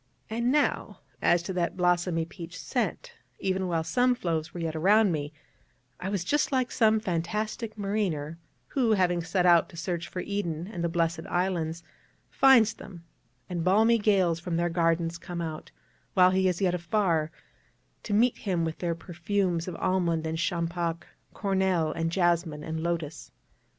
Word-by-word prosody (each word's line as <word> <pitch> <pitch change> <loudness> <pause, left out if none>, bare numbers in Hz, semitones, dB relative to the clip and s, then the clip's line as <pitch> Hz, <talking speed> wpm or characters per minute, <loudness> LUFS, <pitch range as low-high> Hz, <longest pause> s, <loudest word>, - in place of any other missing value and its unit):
And 235 +2 +1
now, 295 0 0 0.2
as 175 0 +3
to 190 - -4
that 175 0 -1
blossomy 175 -2 +1
peach 170 +1 -9
scent - - -3 0.2
even 190 -1 -1
while 165 -2 0
some 250 +7 +2
floes 165 -6 -2
were 175 - -7
yet 165 -1 -3
around 200 +5 +4
me 150 -2 -3 0.7
I 185 - -3
was 195 -3 -1
just 295 +12 +1
like 255 -2 +1
some 220 -2 +3
fantastic 215 +4 -3
mariner, 185 -7 -2 0.3
who, 240 -5 +2
having 180 -3 +2
set 180 +2 0
out 170 -2 +5
to 170 - -13
search 170 0 -3
for 180 - -5
Eden 175 -5 -3
and 185 -4 -5
the 170 - +1
Blessed 165 -1 -1
Islands, 170 -2 -1 0.5
finds 240 -5 +5
them, 175 -4 -12 0.4
and 175 -3 -3
balmy 220 +6 +4
gales 190 -6 +2
from 170 -1 -3
their 175 0 +1
gardens 165 0 0
come 175 0 -6
out, 160 -2 -5 0.5
while 185 -1 +6
he 190 0 +2
is 180 +1 -1
yet 185 -2 +2
afar, 170 -3 0 0.7
to - - -4
meet 240 +3 +3
him 180 -5 -1
with 160 0 -4
their 170 -2 -1
perfumes 175 0 -2
of 180 - -4
almond 170 -4 0
and 160 0 -2
champac, 170 0 -2 0.3
cornel 190 -5 +1
and 165 +1 -2
jasmin 170 -4 +1
and 160 +1 -4
lotus. 165 -3 -3
175 Hz, 165 wpm, -28 LUFS, 165-195 Hz, 0.7 s, while